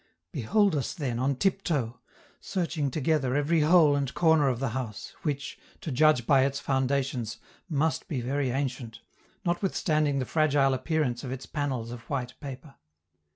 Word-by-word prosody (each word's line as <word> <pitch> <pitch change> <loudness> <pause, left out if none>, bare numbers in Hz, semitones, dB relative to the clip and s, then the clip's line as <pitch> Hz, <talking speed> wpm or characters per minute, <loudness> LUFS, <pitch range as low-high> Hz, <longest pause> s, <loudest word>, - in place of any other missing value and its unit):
Behold 180 - +2
us, 140 - -2
then, 130 -9 -2
on 135 +2 +1
tiptoe, 145 - 0 0.4
searching 165 -6 -2
together 140 -2 0
every 150 +3 +2
hole 155 -1 +5
and 140 -2 -1
corner 160 -4 +4
of 125 -3 0
the 135 -1 -1
house, 115 -3 -5
which, 140 -3 -3 0.2
to 155 - -5
judge 150 -2 +4
by 135 -1 +5
its 140 0 0
foundations, 130 -3 -1 0.3
must 160 +3 0
be 150 -8 -2
very 135 +2 -1
ancient, 125 -3 -3 0.4
notwithstanding 160 -5 +1
the 130 - -1
fragile 145 -3 +3
appearance 130 -2 -1
of 125 - -5
its 130 0 -5
panels 130 -6 -3
of 120 - -6
white 130 -3 -2
paper. 135 0 -8
140 Hz, 155 wpm, -28 LUFS, 130-155 Hz, 0.4 s, hole